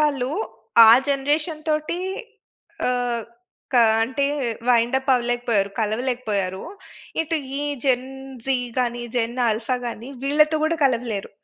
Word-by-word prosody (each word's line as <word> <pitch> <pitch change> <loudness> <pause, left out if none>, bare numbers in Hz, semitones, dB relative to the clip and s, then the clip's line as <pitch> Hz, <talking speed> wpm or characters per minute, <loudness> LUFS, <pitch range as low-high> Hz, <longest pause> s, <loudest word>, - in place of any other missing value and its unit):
వాళ్ళు, 280 -4 +1 0.6
ఆ - - +10 0.2
జనరేషన్ 300 +3 -1
తోటీ 305 +3 -1 0.9
ఆహ్, 245 -2 -1 0.5
క - - +3 0.3
అంటే 265 +4 -1 0.4
వైండప్ 250 +3 +2
అవ్వలేకపోయారు, 240 -4 0
కలవలేకపోయారూ. 215 -4 -2 0.6
ఇటు 325 +1 -1 0.2
ఈ - - -2 0.2
జెన్ 255 -1 +2 0.4
జీ 270 -1 +3 0.2
గానీ, 240 -1 -1
జెన్ 235 0 -1
ఆల్ఫా 225 +3 0
గాని 235 +1 -6 0.2
వీళ్ళతో 305 +2 +3
కూడా 325 +1 +1
కలవలేరు. 235 -6 -1
250 Hz, 110 wpm, -23 LUFS, 235-280 Hz, 0.9 s, ఆ